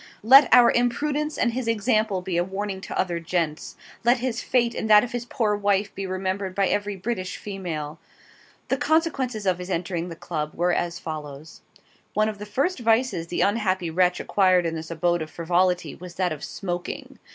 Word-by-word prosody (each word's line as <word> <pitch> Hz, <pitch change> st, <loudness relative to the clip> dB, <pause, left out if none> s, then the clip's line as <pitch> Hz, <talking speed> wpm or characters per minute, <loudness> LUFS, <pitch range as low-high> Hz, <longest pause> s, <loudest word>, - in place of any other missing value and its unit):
Let 265 Hz, +3 st, +8 dB
our 245 Hz, -1 st, +8 dB
imprudence 295 Hz, +5 st, 0 dB
and 235 Hz, -2 st, +1 dB
his 255 Hz, -1 st, -3 dB
example 215 Hz, -3 st, +1 dB
be 185 Hz, -2 st, -3 dB
a 175 Hz, -, +2 dB
warning 195 Hz, +1 st, -4 dB
to -, -, -5 dB
other 175 Hz, -2 st, 0 dB
gents; 165 Hz, -2 st, -2 dB, 0.3 s
let 240 Hz, +2 st, +4 dB
his 245 Hz, -1 st, -2 dB
fate 240 Hz, -2 st, +1 dB
and 220 Hz, -, -3 dB
that 210 Hz, -1 st, +8 dB
of 245 Hz, -, -5 dB
his 245 Hz, -1 st, -4 dB
poor 220 Hz, -5 st, 0 dB
wife 205 Hz, 0 st, 0 dB
be 195 Hz, -1 st, -5 dB
remembered 185 Hz, 0 st, -3 dB
by 195 Hz, -1 st, +2 dB
every 205 Hz, 0 st, -1 dB
British 185 Hz, -1 st, -4 dB
female. 170 Hz, -6 st, -5 dB, 0.7 s
The -, -, +1 dB
consequences 275 Hz, -9 st, 0 dB
of 185 Hz, -2 st, +1 dB
his 180 Hz, +1 st, -7 dB
entering 175 Hz, -1 st, -2 dB
the 165 Hz, -, -7 dB
Club 155 Hz, -2 st, -4 dB
were 175 Hz, +1 st, +1 dB
as 175 Hz, 0 st, -1 dB
follows: 150 Hz, -2 st, -8 dB, 0.5 s
One 215 Hz, +1 st, +3 dB
of 210 Hz, -2 st, -7 dB
the 210 Hz, -, -7 dB
first 280 Hz, -, 0 dB
vices 230 Hz, -6 st, +1 dB
the 175 Hz, -, -2 dB
unhappy 190 Hz, -5 st, +1 dB
wretch 180 Hz, +1 st, +2 dB
acquired 185 Hz, -3 st, +3 dB
in 165 Hz, -, -1 dB
this 160 Hz, 0 st, -6 dB
abode 175 Hz, +1 st, 0 dB
of 155 Hz, -, -5 dB
frivolity 175 Hz, -1 st, 0 dB
was 180 Hz, -1 st, -11 dB
that 185 Hz, -1 st, 0 dB
of 150 Hz, -, -9 dB
SMOKING. 175 Hz, -2 st, -5 dB
190 Hz, 190 wpm, -24 LUFS, 175-230 Hz, 0.7 s, Let